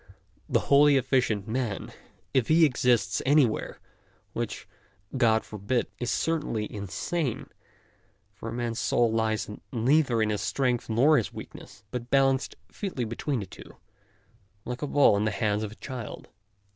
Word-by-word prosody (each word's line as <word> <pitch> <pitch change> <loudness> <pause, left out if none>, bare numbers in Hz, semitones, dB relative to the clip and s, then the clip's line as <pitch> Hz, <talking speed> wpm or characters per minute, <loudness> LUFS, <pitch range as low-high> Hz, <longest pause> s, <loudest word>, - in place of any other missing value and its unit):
The - - +2
wholly 145 0 +5
effi 130 0 +2
cient 105 -5 -2
man, 115 -2 -3 0.4
if 130 -4 +2
he 160 +1 +6
exists 120 - +2
anywhere, 135 -5 +2 0.6
which - - -4 0.5
God 115 -4 +3
forbid, 110 +4 -1
is 120 - -2
certainly 150 -10 -1
insane, 105 - -3 0.8
for 100 +4 -7
a - - -5
man's 120 0 -3
soul 120 -2 +2
lies 110 -1 0 0.2
neither 130 +1 +2
in 105 - 0
his 105 - -2
strength 125 -4 -1
nor 135 +8 +4
his 115 - -1
weak - - -9
ness, 95 - -13
but 125 -1 -5
balanced 135 -1 +2 0.2
featly 180 - -3
between 115 +3 -2
the - - -5
two, - - -13 0.9
like 125 +1 -5
a 145 - -2
ball 140 -7 +5
in 105 - 0
the - - +2
hands 105 0 0
of 105 -1 -4
a - - -11
child. 125 -3 -8
120 Hz, 155 wpm, -27 LUFS, 110-135 Hz, 0.9 s, he